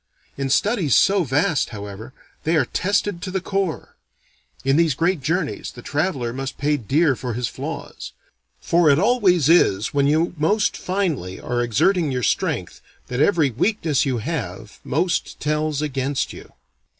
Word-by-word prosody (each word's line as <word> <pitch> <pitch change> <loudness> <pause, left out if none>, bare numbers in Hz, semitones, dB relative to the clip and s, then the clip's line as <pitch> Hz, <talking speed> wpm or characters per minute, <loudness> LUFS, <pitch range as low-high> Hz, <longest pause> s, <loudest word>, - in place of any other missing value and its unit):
In 135 -1 -3
studies 185 - +2
so 195 -1 +4
vast, 145 +2 +1
however, 105 +2 -8 0.3
they 165 +2 +1
are 145 -5 +3
tested 200 +3 -1
to 190 - -4
the 190 +1 -1
core. 190 -2 -3 0.7
In 135 0 +3
these 160 -4 +3
great 170 +1 +1
journeys 165 +7 -2
the 120 - -12
traveller 145 -6 -1
must 135 +1 -5
pay 150 +1 +1
dear 145 +4 +2
for 120 -2 -5
his 125 0 -1
flaws. - - -7 0.5
For 170 -2 +3
it 140 - +5
always 190 - +3
is 110 - +3
when 140 -1 +2
you 160 +4 +2
most 205 +7 +2
finely 165 - -2
are 120 0 -2
exerting 155 - +2
your 125 -1 -2
strength - - -1 0.3
that 125 +2 -1
every 155 -5 +3
weakness 160 - +1
you 135 -4 -1
have 115 -4 -5
most 170 +6 -1
tells 150 0 -1
against 135 -1 -2
you. - - -12
150 Hz, 155 wpm, -22 LUFS, 130-180 Hz, 0.7 s, it